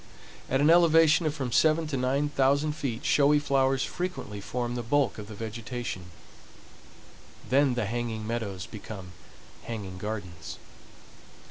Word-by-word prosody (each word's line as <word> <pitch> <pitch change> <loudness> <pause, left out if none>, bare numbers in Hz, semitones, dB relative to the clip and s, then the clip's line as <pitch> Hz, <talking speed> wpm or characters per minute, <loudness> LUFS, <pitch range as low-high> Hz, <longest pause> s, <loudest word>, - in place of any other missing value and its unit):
At 135 +1 +2
an 150 +3 +6
elevation 165 -1 +5
of 150 - -2
from 130 -5 -3
seven 160 +6 +3
to 145 - -2
nine 135 +3 +1
thousand 140 +1 +2
feet 135 -6 -4
showy 145 +1 +5
flowers 135 -2 +2
frequently 175 - -4
form 120 +3 -3
the 120 - -2
bulk 120 -1 +1
of 105 - -8
the 110 - -9
vegetation; 115 -2 -5 1.4
then 135 -1 +3
the 120 -3 0
hanging 115 -1 -3
meadows 105 -5 -3
become 100 -3 -9 0.5
hanging 100 -5 -6
gardens. 95 -6 -6
125 Hz, 135 wpm, -28 LUFS, 110-145 Hz, 1.4 s, an